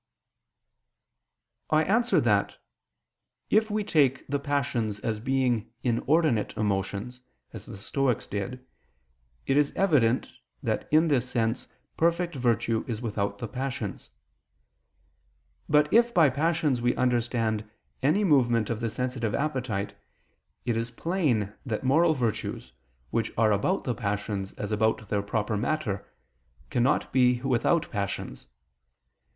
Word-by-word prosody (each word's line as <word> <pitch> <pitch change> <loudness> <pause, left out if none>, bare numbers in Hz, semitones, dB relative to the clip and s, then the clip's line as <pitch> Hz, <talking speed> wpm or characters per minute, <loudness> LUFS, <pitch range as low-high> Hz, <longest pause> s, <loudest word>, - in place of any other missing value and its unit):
I 155 0 +4
answer 235 +7 +3
that, - - +1 0.9
If 220 0 +4
we 210 0 0
take 140 -8 +2
the 145 +1 -1
passions 140 -7 -1
as 110 -2 -2
being 125 -2 0
inordinate 130 0 +1
emotions, 105 +4 -2 0.3
as - - -9
the - - -8
Stoics 125 +3 -1
did, 125 +6 -5 0.8
it 135 - +2
is 145 -1 +3
evident 140 -11 +2 0.3
that - - -1
in 155 +2 +5
this 125 -4 +1
sense 115 -2 -1 0.3
perfect 170 +1 +1
virtue 120 -3 +1
is 115 -4 -3
without 100 -3 -2
the 115 - -5
passions. 125 -6 -4 1.6
But 150 0 +3
if 235 +1 +4
by 155 -6 +6
passions 150 -2 +1
we 120 +1 +2
understand 115 -3 0 0.3
any 155 +10 +3
movement 120 - +3
of 110 - -2
the 115 -1 -1
sensitive 125 -2 -2
appetite, 125 -9 -2 0.7
it 120 -2 0
is 115 +1 -2
plain 125 - 0
that 115 -2 -3
moral 160 +5 +4
virtues, 110 - -3 0.4
which 115 -1 0
are 110 -1 +4
about 105 - +1
the 125 - -1
passions 100 -3 -3
as 105 0 -5
about 110 0 0
their 100 -1 +1
proper 105 +1 -1
matter, 110 -3 -2 0.6
cannot 130 +4 +1
be 125 -1 +4
without 135 +6 +1
passions. 100 - -4
125 Hz, 125 wpm, -27 LUFS, 110-145 Hz, 1.6 s, by